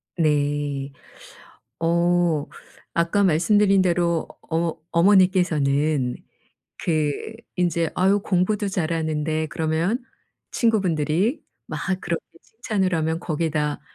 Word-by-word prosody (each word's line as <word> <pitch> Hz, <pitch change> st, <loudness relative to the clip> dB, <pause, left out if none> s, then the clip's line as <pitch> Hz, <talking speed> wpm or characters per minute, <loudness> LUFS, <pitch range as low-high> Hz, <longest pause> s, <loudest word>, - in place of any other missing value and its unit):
네. 145 Hz, -3 st, 0 dB, 0.9 s
어 170 Hz, -2 st, +2 dB, 0.5 s
아까 170 Hz, +4 st, +2 dB
말씀드린 195 Hz, +3 st, +4 dB
대로 170 Hz, -2 st, +1 dB
어머 165 Hz, 0 st, -2 dB
어머니께서는 160 Hz, -7 st, +3 dB, 0.6 s
그 155 Hz, -3 st, 0 dB, 0.4 s
인제 170 Hz, -2 st, +1 dB
"아유 195 Hz, +2 st, +3 dB
공부도 200 Hz, +2 st, 0 dB
잘하는데." 160 Hz, -3 st, -1 dB
그러면 165 Hz, +9 st, 0 dB, 0.5 s
친구분들이 190 Hz, -, +1 dB, 0.2 s
막 -, -, -5 dB, 0.2 s
그렇게 170 Hz, -1 st, -3 dB, 0.2 s
칭찬을 210 Hz, -5 st, -2 dB
하면 160 Hz, 0 st, 0 dB
거기다 150 Hz, -2 st, -1 dB
170 Hz, 215 characters per minute, -23 LUFS, 155-185 Hz, 0.9 s, 말씀드린